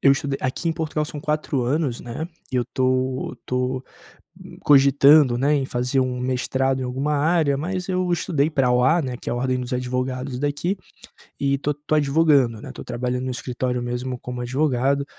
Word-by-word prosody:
Eu 140 - +6
estudei 140 -1 -2
aqui 130 +6 -2
em - - +1
Portugal 160 -1 -2
são 150 -1 -7
4 150 -3 -1
anos, 135 0 0
né, 125 +8 -5 0.2
e - - 0
eu 125 - +1
tô 130 0 0
tô 125 +1 -2 0.8
cogitando, 140 -1 +6
né, 140 +4 +2
em 140 -2 +1
fazer 125 +1 0
um 130 -1 -1
mestrado 130 +1 0
em - - -2
alguma 135 +4 -1
área, 150 -1 +2
mas 180 +5 -3
eu 185 -1 0
estudei 155 -3 +1
pra 135 -5 +2
OA, 130 +8 +3
né, 130 -3 -4
que - - -6
é - - 0
a - - -2
Ordem 130 +1 0
dos 125 +1 -6
Advogados 125 +1 -2
daqui, 145 +7 -1 0.6
e 140 0 +2
estou 140 +2 -1
estou 150 +1 -2
advogando, 140 -6 +3
né, - - -9
estou - - -9
trabalhando 125 +1 -2
no 130 - -2
escritório 125 0 -3
mesmo 125 +1 -3
como 125 0 -6
advogado, 135 +1 +1
135 Hz, 185 wpm, -23 LUFS, 125-150 Hz, 0.8 s, Eu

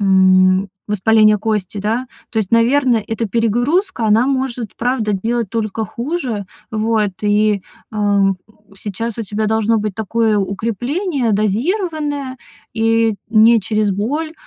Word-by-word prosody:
м, 190 0 +4 0.2
воспаление 215 +1 +4
кости, 210 -2 -2
да. 225 +6 -1 0.2
То 225 - -2
есть, 205 -4 -1
наверное, 235 -1 +3
эта 225 0 -2
перегрузка, 235 - 0
она 220 +4 +4
может, 260 -5 -2
правда, 230 -3 0
делать 225 +2 -1
только 220 -1 -2
хуже, 240 - -4 0.2
вот. 215 -1 0
И, 210 -1 +2 0.3
ам, 200 -2 +1 0.4
сейчас 215 +4 -5
у - - -1
тебя 210 +1 -3
должно 220 +1 +1
быть 210 -2 -3
такое 220 0 0
укрепление 235 - -1
дозированное, 285 - -1 0.3
и 225 -1 +1
не 225 +1 +5
через 215 +1 0
боль. 280 +12 -2
220 Hz, 125 wpm, -17 LUFS, 205-240 Hz, 0.4 s, не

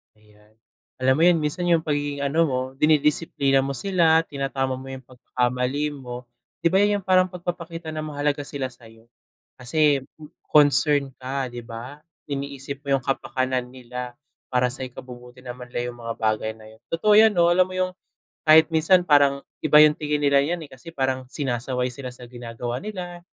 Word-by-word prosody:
Ayan. 105 0 -25 0.5
Alam 130 0 +4
mo - - +4
yun 175 -1 +5
minsan 155 +4 -2
yung 165 -2 +3
pagiging 145 -1 -2
ano 150 +4 +1
mo, 130 -3 -1 0.2
dinidisiplina 150 -2 +2
mo 135 +1 -3
sila, 165 +1 +3
tinatama 135 -2 -2
mo 135 - -10
yung 130 -1 -8
pagkakamali 125 +3 -2
mo, 125 -3 -8 0.4
'di - - +5
ba' 190 - +5
yan 205 0 +2
yung - - -30
parang 185 -1 +4
pagpapakita 170 -2 -6
na 155 - -4
mahalaga 145 -1 -2
sila 140 -1 -4
sa'yo. 115 -2 -17 0.5
Kasi 145 +2 +2 0.5
concern 145 -1 +4
ka, 130 0 -3
'di 120 0 -7
ba? 120 +5 -9 0.2
Iniisip 140 0 -6
mo 140 -1 +1
yung 130 - -10
kapakanan 130 -2 -2
nila 125 -1 -8 0.3
para 125 -1 +1
sa 130 - 0
ikabubuti 125 0 -10
naman 125 0 -9
nila 120 0 -3
yung 120 - -15
mga 115 0 -4
bagay 110 0 0
na 110 - -15
yun. 110 +1 -20
Totoo 210 +6 +2
'yan 215 0 +6
'no, 170 0 +4
alam 185 +1 +3
mo 185 - -7
yung 185 0 0 0.5
kahit 155 +1 +7
minsan 165 +3 +4
parang 140 -3 +4 0.2
iba 150 0 +7
yung 150 0 +5
tingin 150 -1 -1
nila 140 -1 +4
niyan, 170 +2 -2
eh, - - -18
kasi 130 +5 -12
parang 130 -3 -1
sinasaway 125 -2 -2
sila 130 0 -6
sa 125 0 -11
ginagawa 120 0 -5
nila, 180 -4 -7
140 Hz, 175 wpm, -23 LUFS, 125-155 Hz, 0.5 s, kahit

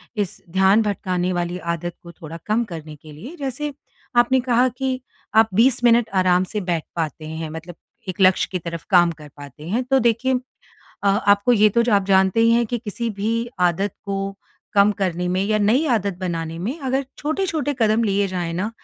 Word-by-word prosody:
इस 205 -4 -3
ध्यान 190 +4 +4
भटकाने 185 -4 -1
वाली 175 0 -2 0.2
आदत 175 +1 -5
को 170 - -10
थोड़ा 165 0 -9
कम 215 +3 +1
करने 155 -2 -7
के 155 +1 -15
लिए। 220 - -10
जैसे 285 +2 -3 0.4
आपने 240 +2 +4
कहा 245 +1 +4
कि 260 -1 -1 0.4
आप 220 0 +6
20 240 +4 +3
मिनट 235 -1 +4
आराम 180 0 +3
से 205 +3 -4
बैठ 175 -4 -1
पाते 160 -1 -3
हैं। 160 0 -5
मतलब 160 +2 -8 0.3
एक 185 +1 -4
लक्ष्य 185 0 +4
की 185 - -2
तरफ 170 -1 -6
काम 175 -3 +5
कर 150 -2 -12
पाते 145 +2 -11
हैं, 235 +6 0
तो 265 +1 +2
देखिए 245 +2 +1 0.6
अ, - - -1
आपको 200 +3 +3
ये 215 -2 +5
तो 235 +3 +2
ज 235 - -3
आप 200 -2 +3
जानते 190 +2 +3
ही 230 0 +5
हैं 235 +1 +3
कि 240 +2 -2
किसी 230 +1 -4
भी 225 +3 -2
आदत 180 +3 +1
को 195 0 -3 0.4
कम 200 0 +5
करने 180 -3 -2
में 185 +1 0
या 215 +1 +1
नई 225 +9 +2
आदत 200 -5 0
बनाने 165 -3 -3
में 230 - -4
अगर 270 -1 -1
छोटे-छोटे 310 -2 -1
कदम 220 0 +3
लिए 200 -1 +1
जाएँ 175 -3 -3
न 195 +5 -2
200 Hz, 195 wpm, -21 LUFS, 175-235 Hz, 0.6 s, आप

